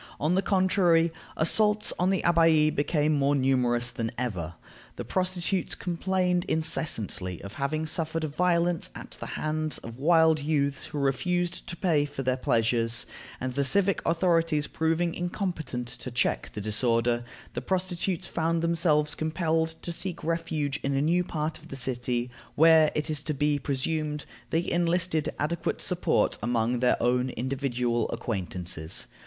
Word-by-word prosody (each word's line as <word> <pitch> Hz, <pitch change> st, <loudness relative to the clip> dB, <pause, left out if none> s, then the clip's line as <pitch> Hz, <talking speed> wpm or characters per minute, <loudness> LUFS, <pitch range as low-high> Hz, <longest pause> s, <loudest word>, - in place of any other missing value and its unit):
On 155 Hz, +4 st, +1 dB
the 190 Hz, -, +3 dB
contrary, 185 Hz, -4 st, +3 dB, 0.3 s
assaults 210 Hz, +6 st, +3 dB
on 180 Hz, +1 st, +3 dB
the 190 Hz, -1 st, +1 dB
Abbaye 165 Hz, -2 st, +4 dB
became 150 Hz, +1 st, +1 dB
more 140 Hz, 0 st, +2 dB
numerous 125 Hz, -3 st, +1 dB
than 115 Hz, -1 st, -3 dB
ever. 90 Hz, -10 st, -3 dB, 0.4 s
The -, -, -6 dB
prostitutes 185 Hz, 0 st, -1 dB
complained 180 Hz, 0 st, 0 dB
incessantly 110 Hz, -, -1 dB
of 100 Hz, +2 st, -8 dB
having 155 Hz, +3 st, -1 dB
suffered 160 Hz, +1 st, -2 dB
violence 170 Hz, +2 st, +1 dB
at -, -, -9 dB
the -, -, -6 dB
hands 155 Hz, 0 st, -1 dB
of 115 Hz, +2 st, -9 dB
wild 160 Hz, +1 st, +4 dB
youths 140 Hz, -2 st, 0 dB
who 150 Hz, -, -7 dB
refused 175 Hz, +6 st, -1 dB
to 170 Hz, -, -5 dB
pay 155 Hz, -6 st, +2 dB
for 145 Hz, -2 st, -5 dB
their 130 Hz, 0 st, +1 dB
pleasures; 115 Hz, -1 st, +1 dB, 0.3 s
and 130 Hz, 0 st, -3 dB
the 140 Hz, -, +1 dB
civic 195 Hz, +5 st, +2 dB
authorities 165 Hz, -3 st, +2 dB
proving 165 Hz, +2 st, 0 dB
incompetent 175 Hz, -, -3 dB
to 120 Hz, +2 st, -6 dB
check 120 Hz, 0 st, 0 dB
the 105 Hz, -, -5 dB
disorder, 115 Hz, +2 st, +2 dB, 0.3 s
the -, -, -3 dB
prostitutes 185 Hz, -1 st, -1 dB
found 165 Hz, 0 st, -1 dB
themselves 155 Hz, -3 st, +2 dB
compelled 160 Hz, 0 st, 0 dB
to 175 Hz, -, -4 dB
seek 175 Hz, 0 st, -6 dB
refuge 155 Hz, -3 st, -1 dB
in 140 Hz, 0 st, -1 dB
a 135 Hz, -, +2 dB
new 175 Hz, +3 st, +2 dB
part 155 Hz, -2 st, -3 dB
of 160 Hz, -, -15 dB
the 135 Hz, -, -7 dB
city, 125 Hz, -1 st, -2 dB, 0.2 s
where, 160 Hz, -1 st, +6 dB
it 150 Hz, +1 st, -1 dB
is 150 Hz, -1 st, -1 dB
to 150 Hz, 0 st, -3 dB
be 145 Hz, +1 st, +1 dB
presumed, 150 Hz, +2 st, -2 dB, 0.2 s
they 165 Hz, +2 st, 0 dB
enlisted 170 Hz, -2 st, +1 dB
adequate 165 Hz, +3 st, -1 dB
support -, -, +1 dB
among 120 Hz, +1 st, 0 dB
their 125 Hz, 0 st, +3 dB
own 125 Hz, +1 st, +2 dB
individual 125 Hz, -2 st, -1 dB
acquaintances. 90 Hz, -6 st, -4 dB
155 Hz, 150 wpm, -27 LUFS, 130-170 Hz, 0.4 s, where